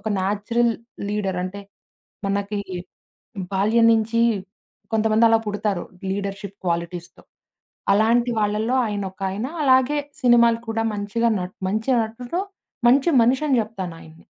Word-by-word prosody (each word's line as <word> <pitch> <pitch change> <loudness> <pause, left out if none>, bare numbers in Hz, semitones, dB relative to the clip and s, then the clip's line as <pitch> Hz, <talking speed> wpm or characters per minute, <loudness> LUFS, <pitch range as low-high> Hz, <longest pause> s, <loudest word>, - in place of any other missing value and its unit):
ఒక 220 - -4
natural 210 +5 +1 0.4
leader 195 -3 -1
అంటే, 195 +2 -6 0.7
మనకి 200 +1 -1 0.9
బాల్యం 215 +4 +3
నుంచి 225 +1 +1 0.7
కొంతమంది 220 +1 +3
అలా 225 0 +4
పుడతారు 205 -3 -1 0.3
లీడర్షిప్ 200 0 -4
క్వాలిటీస్‌తో. 170 0 -3 0.7
అలాంటి 235 +4 +3
వాళ్ళల్లో 215 +4 0
ఆయనొకాయన 195 +1 -3 0.2
అలాగే 260 +1 +4 0.2
సినిమాలు 235 -2 +5
కూడా 225 0 0
మంచిగా 210 +3 0
నట్ 180 0 -6
మంచి 220 +6 -1
నటుడు. 240 +10 -4 0.5
మంచి 275 +7 +5
మనిషని 265 +3 +2
జెప్తానాయన్ని. 175 -6 -8
215 Hz, 105 wpm, -22 LUFS, 195-235 Hz, 0.9 s, సినిమాలు